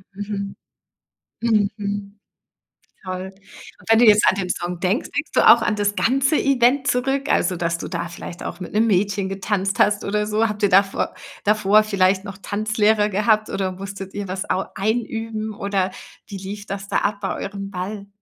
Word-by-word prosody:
Mhm. 200 -1 -5 0.9
Mhm. 205 -2 -1 0.9
Toll. 185 0 -4
Und 195 +2 -16
wenn 225 - +6
du 245 - +6
jetzt 210 -1 +6
an - - +6
den 185 -2 -3
Song 175 0 -3
denkst, 195 - 0
denkst - - -2
du - - +5
auch - - +8
an 210 - +1
das 205 0 0
ganze 270 +9 +2
Event 265 +1 +3
zurück, 270 +2 0
also, 185 - +2
dass 170 0 -1
du - - -6
da 170 -1 -3
vielleicht 175 0 -9
auch - - -6
mit 180 - -8
'nem 225 +2 +3
Mädchen 200 0 +1
getanzt 195 0 -1
hast 210 0 +3
oder 210 +1 0
so? 215 +2 +1
Habt 210 -1 -5
ihr 205 - +5
davor 195 +1 +2 0.3
davor 210 0 +4
vielleicht 195 -2 +2
noch 200 -1 -8
Tanzlehrer 215 +1 +1
gehabt, 215 +2 +2
oder 190 -1 -1
musstet 195 0 -8
ihr 205 -1 -4
was 185 +1 -4
au 190 - 0
einüben, 220 +1 -2
oder 195 -2 -1 0.4
wie 200 - -7
lief 200 +2 -7
das 195 0 -6
da - - 0
ab 205 0 -1
bei 195 - -2
eurem 195 0 -5
Ball? 200 +2 -5
205 Hz, 180 wpm, -22 LUFS, 195-215 Hz, 0.9 s, auch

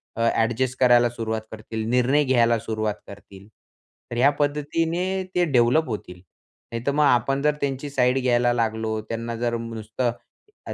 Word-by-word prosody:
अ, 115 - -3
adjust 120 +3 0
करायला 120 -1 +5
सुरुवात 110 -2 -3
करतील. 110 0 -6
निर्णय 125 +4 +3
घ्यायला 120 -3 +3
सुरुवात 110 -1 -2
करतील. 100 -1 -13 0.6
तर - - -4
ह्या 135 +3 +5
पद्धतीने 165 +6 -1
ते 180 - +3
डेव्हलप 125 +5 +3
होतील, 105 -5 -5 0.6
नाहीतर 115 +4 -2
मग 150 +1 +2
आपण 135 0 +2
जर 150 +1 +3
त्यांची 140 +1 -2
साईड 130 -1 +2
घ्यायला 120 -1 +2
लागलो 110 -1 -1
त्यांना 115 +1 -4
जर 120 0 -1
नुसतं 115 +1 -3 0.6
आ - - -3
120 Hz, 150 wpm, -23 LUFS, 115-135 Hz, 0.6 s, करायला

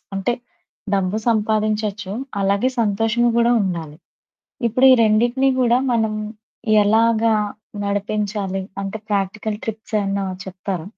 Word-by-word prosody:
అంటే 195 +5 0 0.6
డబ్బు 195 +1 0
సంపాదించొచ్చు, 215 -2 0 0.3
అలాగే 200 +5 +2
సంతోషము 225 +3 +1
గూడా 235 0 +4
ఉండాలి. 165 -5 -4 0.7
ఇప్పుడు 255 +4 +1
ఈ - - +8
రెండిటిని 240 +5 +3
గూడా 245 0 +4
మనం 220 -2 +1 0.7
ఎలాగా 225 +1 +3 0.5
నడిపించాలి? 200 -1 -2 0.2
అంటే 195 +2 -4
ప్రాక్టికల్ 205 +2 -1
ట్రిప్స్ 220 0 -4
ఏమన్నా 195 0 -1 0.2
చెప్తారా? 185 -2 -5
215 Hz, 105 wpm, -20 LUFS, 195-225 Hz, 0.7 s, ఈ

